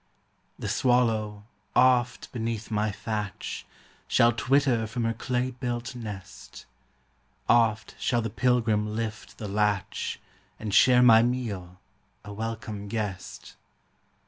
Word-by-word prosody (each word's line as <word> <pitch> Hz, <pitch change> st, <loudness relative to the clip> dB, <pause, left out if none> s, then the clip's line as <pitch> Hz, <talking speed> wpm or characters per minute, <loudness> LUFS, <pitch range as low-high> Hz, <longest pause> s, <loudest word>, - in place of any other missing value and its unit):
The -, -, -5 dB
swallow, 110 Hz, -5 st, +1 dB, 0.3 s
oft, 125 Hz, -1 st, +3 dB
beneath 115 Hz, -2 st, -4 dB
my 105 Hz, 0 st, +1 dB
thatch, 105 Hz, 0 st, -5 dB, 0.4 s
Shall 115 Hz, 0 st, +5 dB
twitter 125 Hz, -1 st, +2 dB
from 120 Hz, +2 st, -3 dB
her 115 Hz, 0 st, +1 dB
clay 125 Hz, +2 st, -1 dB
built 120 Hz, 0 st, -4 dB
nest; 105 Hz, -5 st, -9 dB, 0.8 s
Oft 110 Hz, -3 st, +3 dB
shall 120 Hz, -2 st, +1 dB
the 115 Hz, -, -3 dB
pilgrim 110 Hz, -3 st, +1 dB
lift 110 Hz, -1 st, -5 dB
the 105 Hz, -, -5 dB
latch, 105 Hz, -1 st, -1 dB, 0.4 s
And 105 Hz, -2 st, -4 dB
share 125 Hz, +3 st, +6 dB
my 115 Hz, -2 st, +8 dB
meal, 105 Hz, -8 st, -2 dB, 0.5 s
a 105 Hz, -, -7 dB
welcome 110 Hz, -1 st, -5 dB
guest. 100 Hz, -3 st, -5 dB
115 Hz, 115 wpm, -27 LUFS, 105-120 Hz, 0.8 s, my